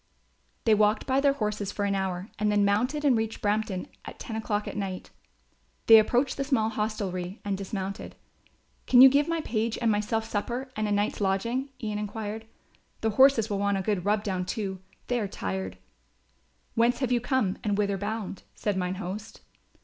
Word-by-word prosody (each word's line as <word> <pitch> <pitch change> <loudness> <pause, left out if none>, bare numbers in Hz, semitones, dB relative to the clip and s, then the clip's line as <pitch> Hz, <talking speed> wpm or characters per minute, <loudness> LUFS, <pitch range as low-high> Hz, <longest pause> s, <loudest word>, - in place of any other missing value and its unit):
They 225 - +4
walked 210 0 +3
by 265 0 +2
their 280 -1 +4
horses 210 -5 -2
for 205 - -2
an 200 - +1
hour 190 0 -3
and 210 0 +2
then 205 -1 +3
mounted 250 +9 +1
and 270 -4 +5
reached 225 0 -2
Brampton 205 -3 -1 0.2
at - - -9
ten 225 - -6
o'clock 210 -1 -2
at - - -5
night. 195 -3 -4 0.7
They 225 -1 +10
approached 245 +5 +1
the 275 - 0
small 260 -6 +1
hostelry 200 -3 -3
and 200 -1 0
dismounted. 195 0 -5 0.7
"Can 250 -1 +7
you 265 - +11
give 285 +2 +2
my 335 -1 -1
page 230 -4 -1
and 230 -2 +2
myself 215 +2 0
supper 240 +5 -3
and 215 0 -1
a - - -2
night's 205 +1 0
lodging?" 230 +8 0
Ian 210 -1 -2
enquired. 215 +1 -5 0.5
"The 220 - +1
horses 260 -1 +5
will 200 -3 -2
want 200 0 +1
a 190 - -2
good 200 -3 0
rub 205 +1 +1
down, 185 -3 -1
too; 195 -3 -3 0.3
they 245 -1 0
are 210 - -1
tired." 95 - -4 1.0
"Whence 235 +1 +3
have 255 -2 -1
you 240 -1 +2
come 245 -7 0
and 205 -2 0
whither 200 -2 0
bound?" 205 -2 -4
said 205 -2 -1
mine 180 0 -1
host. 200 +4 -7
210 Hz, 190 wpm, -27 LUFS, 200-230 Hz, 1.0 s, you